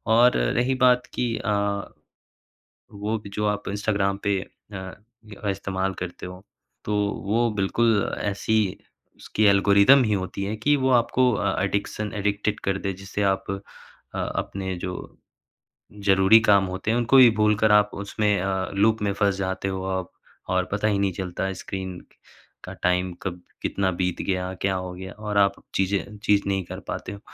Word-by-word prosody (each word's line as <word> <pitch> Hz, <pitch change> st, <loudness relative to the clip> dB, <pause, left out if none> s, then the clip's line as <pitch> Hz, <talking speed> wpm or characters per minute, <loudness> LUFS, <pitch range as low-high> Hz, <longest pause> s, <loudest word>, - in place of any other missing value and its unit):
और 120 Hz, +2 st, +5 dB
रही 120 Hz, -, +1 dB
बात 125 Hz, 0 st, +5 dB
कि 125 Hz, -, -1 dB
अ, 105 Hz, -, -2 dB, 1.4 s
वो 105 Hz, +2 st, -2 dB
भी 105 Hz, -, -11 dB
जो 105 Hz, 0 st, 0 dB
आप 105 Hz, 0 st, 0 dB
इंस्टाग्राम 100 Hz, -1 st, 0 dB
पे 100 Hz, -1 st, +2 dB
अ 100 Hz, +1 st, -12 dB
अ, 105 Hz, +2 st, -9 dB
इस्तेमाल 95 Hz, 0 st, -2 dB
करते 90 Hz, -1 st, -6 dB
हो 90 Hz, +1 st, -10 dB, 0.4 s
तो 105 Hz, -, -1 dB, 0.3 s
वो 115 Hz, +3 st, +2 dB
बिल्कुल 105 Hz, +2 st, +2 dB, 0.2 s
ऐसी 105 Hz, +2 st, -1 dB, 0.6 s
उसकी 110 Hz, -, -1 dB
एल्गोरिदम 100 Hz, +6 st, +6 dB
ही 110 Hz, -, 0 dB
होती 95 Hz, 0 st, -3 dB
है 100 Hz, +2 st, -2 dB
कि 145 Hz, +7 st, +2 dB
वो -, -, +3 dB
आपको 125 Hz, +2 st, +2 dB
अ, 100 Hz, -2 st, 0 dB
एडिक्शन 100 Hz, +1 st, -2 dB
एडिक्टेड 105 Hz, +1 st, -1 dB
कर 95 Hz, -1 st, -1 dB
दे 95 Hz, -, 0 dB
जिससे 100 Hz, +1 st, -3 dB
आप 95 Hz, -, -8 dB
अ 100 Hz, -, -2 dB, 0.8 s
अपने 95 Hz, -1 st, -3 dB
जो 90 Hz, -1 st, -3 dB, 1.1 s
ज़रूरी 95 Hz, +3 st, +6 dB
काम 100 Hz, -3 st, +4 dB
होते 95 Hz, +4 st, -2 dB
हैं 115 Hz, -, +2 dB
उनको 120 Hz, +3 st, +4 dB
ही 130 Hz, -2 st, +9 dB
भूलकर 105 Hz, 0 st, +3 dB
आप 105 Hz, 0 st, +5 dB
उसमें 105 Hz, 0 st, 0 dB
अ, 95 Hz, -1 st, -1 dB
लूप 110 Hz, +3 st, +3 dB
में 100 Hz, -, +1 dB
फँस 100 Hz, -1 st, +1 dB
जाते 95 Hz, 0 st, -2 dB
हो 95 Hz, -1 st, -3 dB
आप 95 Hz, -1 st, -3 dB, 0.4 s
और 95 Hz, 0 st, +1 dB
पता 105 Hz, +2 st, 0 dB
ही 100 Hz, -2 st, +1 dB
नहीं 100 Hz, -1 st, +1 dB
चलता 90 Hz, 0 st, -4 dB
है 95 Hz, -, -2 dB
स्क्रीन 95 Hz, -2 st, -6 dB, 0.7 s
का -, -, -7 dB
टाइम 90 Hz, 0 st, +1 dB
कब 90 Hz, -1 st, -4 dB, 0.2 s
कितना 95 Hz, -1 st, 0 dB
बीत 90 Hz, 0 st, -2 dB
गया, 90 Hz, -1 st, -2 dB
क्या 95 Hz, -1 st, +1 dB
हो 90 Hz, -1 st, -4 dB
गया 95 Hz, +1 st, -8 dB
और 105 Hz, -1 st, -4 dB
आप 100 Hz, -1 st, +4 dB, 0.2 s
चीज़ें 100 Hz, +2 st, -1 dB
ठीक 100 Hz, -1 st, +3 dB
नहीं 95 Hz, -1 st, 0 dB
कर -, -, -7 dB
पाते -, -, -5 dB
हो। 100 Hz, -, -8 dB
100 Hz, 170 wpm, -24 LUFS, 95-105 Hz, 1.4 s, ही